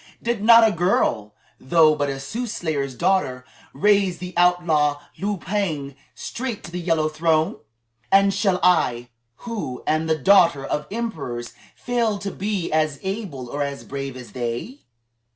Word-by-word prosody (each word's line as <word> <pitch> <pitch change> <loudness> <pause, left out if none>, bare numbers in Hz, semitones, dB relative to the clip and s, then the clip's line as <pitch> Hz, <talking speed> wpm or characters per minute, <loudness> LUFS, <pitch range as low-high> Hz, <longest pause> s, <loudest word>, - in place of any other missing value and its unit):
Did 235 -3 -2
not 230 0 +8
a - - +1
girl 120 - 0 0.2
though 155 +2 +4
but 145 -1 -1
a 135 0 -4
soothsayer's 155 - -3
daughter 170 -7 0 0.3
raise 195 +3 +2
the 180 +1 -7
outlaw 170 -5 +2 0.2
Liu 205 +1 -1
Pang 165 -8 -3 0.2
straight 235 - -5
to 175 - -9
the 180 - -4
Yellow 165 -3 +1
Throne? 155 0 +1 0.5
And 195 0 +5
shall 190 -3 +1
I, 125 -9 +2 0.4
who 210 - -5
am 155 +1 0
the 160 -1 +1
daughter 170 -4 +4
of 150 +1 -3
emperors, 155 - -5 0.2
fail 235 -4 -1
to 200 0 -5
be 200 -3 -3
as 155 -3 +1
able 190 - -5
or 145 +4 -4
as 140 -1 -3
brave 135 -1 -6
as 125 -4 -11
they?" 120 - -4
165 Hz, 150 wpm, -22 LUFS, 140-200 Hz, 0.5 s, not